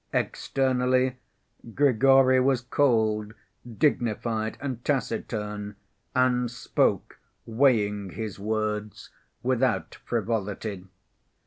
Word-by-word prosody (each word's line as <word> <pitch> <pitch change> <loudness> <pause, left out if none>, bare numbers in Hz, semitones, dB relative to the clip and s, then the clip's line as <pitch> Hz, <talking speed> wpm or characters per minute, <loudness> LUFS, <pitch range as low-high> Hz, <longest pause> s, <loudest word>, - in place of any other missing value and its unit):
Externally, 130 -1 +1 0.6
Grigory 135 -1 +5
was 130 -1 +2
cold, 110 -5 +1 0.4
dignified 115 -5 0
and 130 -4 -5
taciturn, 105 -5 -3 0.4
and 125 -1 +2
spoke, 120 - -1 0.3
weighing 110 -5 +2
his 105 +1 -6
words, 105 0 -3 0.3
without 125 -5 0
frivolity. 105 -3 -3
115 Hz, 75 wpm, -26 LUFS, 105-130 Hz, 0.6 s, Grigory